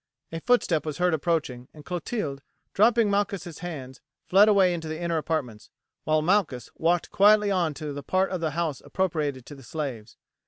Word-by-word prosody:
A 165 - -4
footstep 215 -9 +2
was 155 -2 -5
heard 180 -1 +2
approaching, 150 -6 -1
and 150 -1 -13
Clotilde, 175 - -4 0.3
dropping 225 0 +4
Malchus' 200 -5 -2
hands, 140 -7 -7 0.2
fled 200 +3 +6
away 195 -3 +4
into 165 -2 -5
the 155 0 -5
inner 170 -1 -1
apartments, 145 -9 -3 0.4
while 155 0 +2
Malchus 170 -9 0
walked 170 +1 0
quietly 210 0 +5
on 170 -6 0
to 150 0 -5
the 145 - -6
part 185 +6 0
of 185 -3 -3
the 160 - 0
house 160 -5 -1
appropriated 155 -9 -2
to - - -10
the 135 - -12
slaves. 125 -6 -6
165 Hz, 180 wpm, -26 LUFS, 145-190 Hz, 0.4 s, fled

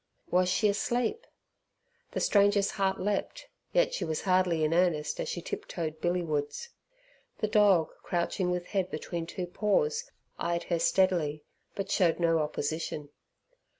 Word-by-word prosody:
Was 180 0 +3
she 200 +3 +3
asleep? 240 - -1 0.9
The - - -1
stranger's 200 -1 +3
heart 195 -1 0
leapt, 205 0 -2 0.2
yet - - +3
she - - -2
was 160 -1 -2
hardly 185 -4 +2
in 155 +1 +2
earnest 165 -4 +1
as - - -2
she 175 - -4
tip - - -5
toed 160 -2 -4
billy 175 0 +1
wards. 150 - -3 0.7
The 215 - 0
dog, 205 -6 +4
crouching 180 +1 -1
with 180 0 -1
head 190 -2 -1
between 165 0 -4
two 180 +1 -4
paws, 455 - 0 0.3
eyed 170 0 -1
her 170 -2 -1
steadily, 165 -6 +2 0.3
but 195 0 -4
showed 175 -3 +3
no 165 -1 +3
opposition. 150 0 -3
180 Hz, 150 wpm, -29 LUFS, 165-200 Hz, 0.9 s, dog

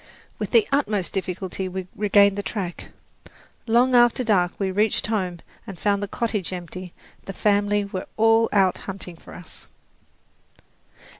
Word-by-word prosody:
With - - -3
the 450 -3 +4
utmost 215 -10 0
difficulty 190 0 -3
we 185 0 -5
regained 200 -1 +4
the 205 - -2
track. 190 -4 -5 0.8
Long 245 +3 +3
after 240 +1 +5
dark 185 -6 +2
we 195 -2 0
reached 210 +3 +1
home 185 -6 -2 0.3
and 195 -3 -8
found 200 -1 +1
the 205 - -2
cottage 210 -4 -2
empty; 180 0 -7 0.3
the 195 - -6
family 205 0 +1
were 190 -2 -6
all 225 +1 +4
out 195 -3 +3
hunting 185 -2 -7
for - - -14
us. 180 - -11
200 Hz, 145 wpm, -23 LUFS, 185-220 Hz, 0.8 s, after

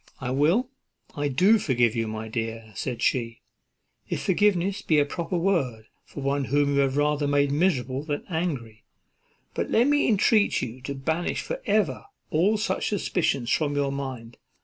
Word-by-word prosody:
"I 125 -2 -3
will, 170 - +2 0.4
I 145 0 -1
do 190 - +4
forgive 120 - +1
you, 115 -1 -1
my 110 0 -5
dear," 115 -1 -4
said 120 +4 -4
she, 115 -2 0 0.7
"if - - -3
forgiveness 195 0 +2
be 155 - +2
a 145 - +4
proper 170 +4 -3
word 140 - -1 0.2
for 145 - -9
one 140 0 0
whom 145 +1 +1
you 140 - +2
have 135 0 +1
rather 145 0 +1
made 145 0 +2
miserable 140 -5 +1
than 145 -1 -4
angry; 140 - -3 0.7
but - - -2
let 235 - +4
me 290 +1 +3
entreat 210 -1 +3
you 125 +1 -6
to 140 +2 -5
banish 160 +6 -2
for - - -5
ever - - +1 0.3
all 190 +8 +3
such 215 - -1
suspicions 160 - 0
from 145 -2 +1
your 140 -1 0
mind. 130 -4 -6
145 Hz, 170 wpm, -25 LUFS, 125-175 Hz, 0.7 s, do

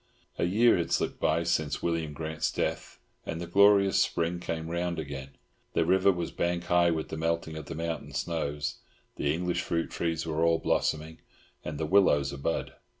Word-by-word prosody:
A - - +2
year 110 +6 +4
had 85 - -2
slipped - - 0
by 85 - +2
since 80 -3 -1
William 85 -3 -1
Grant's 80 +1 -2
death, - - -3 0.3
and 80 - -4
the 85 - -4
glorious 100 +2 +5
Spring 85 +1 0
came 80 -2 -4
round 85 +1 -2
again; 70 -3 -6 0.4
the 85 - +2
river 95 +3 +4
was 85 -3 -3
bank 85 0 -1
high 85 -1 +3
with 80 -2 -2
the 80 - -5
melting 80 0 -1
of 80 -2 -7
the 85 - -6
mountain 80 -2 -4
snows, 75 -1 -2 0.4
the 70 - +1
English 85 +2 -1
fruit 85 -1 -2
trees 80 -1 -2
were 80 0 -1
all 85 0 +4
blossoming, 80 0 -1 0.4
and 75 -1 -5
the 80 - -1
willows 75 -6 +3
a 70 - -7
bud. 80 +4 -2
85 Hz, 185 wpm, -29 LUFS, 80-85 Hz, 0.4 s, glorious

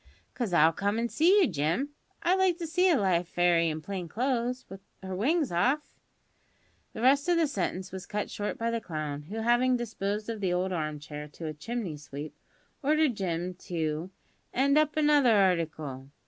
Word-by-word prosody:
"'Cause 235 -6 -2
I'll 165 -1 +5
come 205 +4 -1
an' 235 +1 0
see 360 - +4
you, 355 - +5
Jim. 170 - 0 0.3
I'd 365 +2 +3
like 370 -3 +3
to 345 - -4
see 360 +4 +2
a 330 - +4
live 180 -5 +1
fairy 175 -2 +3
in 155 0 -4
plain 190 -2 -4
clo'se, 250 - -1
with 195 0 -10 0.2
her 190 0 -4
wings 290 - +1
off 255 - +1 0.5
" - - -39
The 225 - -5
rest 280 +5 +4
of 350 - +4
the 330 - +4
sentence 190 - -3
was 190 0 -7
cut 210 0 -3
short 205 0 -3
by 230 0 -1
the 230 -1 -2
clown, 155 -5 -4
who, 220 +2 -4
having 245 +2 +3
disposed 210 -3 -3
of 225 -2 -4
the 185 -2 +1
old 185 +1 0
arm 155 -3 -2
chair 150 0 -8
to 155 +3 -9
a 155 - -3
chimney 195 0 -4
sweep, 145 +1 -8 0.5
ordered 305 -1 +3
Jim 180 -3 -2
to 160 0 -2 0.4
"'and 275 +3 +2
up 305 0 +2
another 295 -5 +5
harticle." 160 -9 0
200 Hz, 190 wpm, -29 LUFS, 170-260 Hz, 0.5 s, I'll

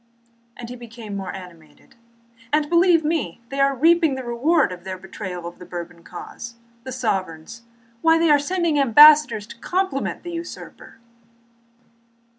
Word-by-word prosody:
and 235 -1 -8
he 250 - -7
became 230 -3 -9
more 195 -2 -5
animated. 175 -4 -13 0.6
"And 295 0 +1
believe 340 -2 +4
me, 300 - -2
they 275 - -5
are 275 0 +3
reaping 325 +1 +3
the 260 - -6
reward 265 - +1
of 180 -1 -9
their 190 0 -6
betrayal 185 -2 -8
of 170 0 -9
the 180 - -10
Bourbon 175 -1 -8
cause. 235 +7 -9 0.3
The 260 - -6
sovereigns! 195 -5 -3 0.4
Why, 325 0 +4
they 330 -1 +3
are 290 - +5
sending 335 0 0
ambassadors 290 -3 +6
to 260 +2 -13
compliment 370 -4 -2
the 350 - -6
usurper." 335 -7 -9
255 Hz, 150 wpm, -22 LUFS, 190-310 Hz, 0.6 s, ambassadors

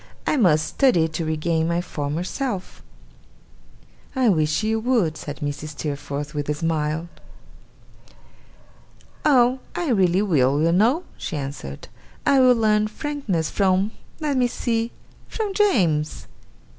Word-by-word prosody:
I - - +2
must 165 - +3
study 180 - +3
to 160 +1 -3
regain 160 +1 0
my 170 0 0
former 150 -1 -3
self.' 200 -1 -4 1.3
'I 255 -3 +3
wish 155 0 +1
you 220 +1 +1
would,' 220 -9 +1
said 145 -2 -7
Mrs. 145 +1 -5
Steerforth, 145 0 -4
with 145 -1 -3
a 150 - +1
smile. 160 0 -1 2.2
'Oh! 255 -3 +4 0.2
I 345 -4 -1
really 190 -4 +3
will, 145 -7 +2
you 165 +2 +3
know!' 235 - +3 0.2
she 160 - -4
answered. 135 - -6 0.4
'I 275 - +5
will 255 -1 +6
learn 215 -2 +2
frankness 215 - -3
from 195 +1 +2 0.3
let 295 -4 -1
me 250 -1 +3
see 230 -1 -1 0.4
from 425 -3 -3
James. 180 - +1
180 Hz, 130 wpm, -23 LUFS, 155-240 Hz, 2.2 s, will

